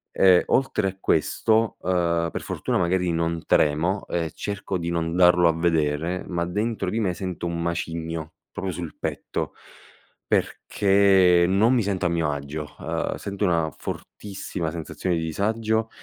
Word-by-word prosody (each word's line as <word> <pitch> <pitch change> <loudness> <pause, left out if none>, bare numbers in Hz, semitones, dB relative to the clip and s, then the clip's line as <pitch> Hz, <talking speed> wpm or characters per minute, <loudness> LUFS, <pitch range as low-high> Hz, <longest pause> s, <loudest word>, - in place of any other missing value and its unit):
e, 95 -2 +6
oltre 120 -7 +1
a 95 - -10
questo, 110 +2 +1
uhm, 85 -2 +1
per - - -4
fortuna - - -2
magari 90 0 +1
non 85 0 -2
tremo 85 +7 +2
e 85 -2 -2
cerco 100 -2 -3
di 85 -1 -3
non 85 0 -1
darlo 90 -1 +6
a 80 - +1
vedere, 80 +1 0
ma 85 -2 -1
dentro 105 +6 -2
di 115 - -1
me 95 -5 0
sento 90 -1 -4
un 85 0 -3
macigno, 85 -1 -3 0.2
proprio 95 -1 -4
sul 85 -2 -6
petto, - - -4 0.7
perché 95 -3 +3
non 105 +7 +3
mi 120 - +3
sento 95 -3 -1
a - - +3
mio 85 -3 0
agio, 70 +1 -6
uhm, - - -2
sento 100 +1 -5
una 85 -4 +1
fortissima 95 -5 -5
sensazione 85 +2 -3
di 80 - -2
disagio, 110 +6 0
90 Hz, 155 wpm, -24 LUFS, 85-100 Hz, 0.7 s, e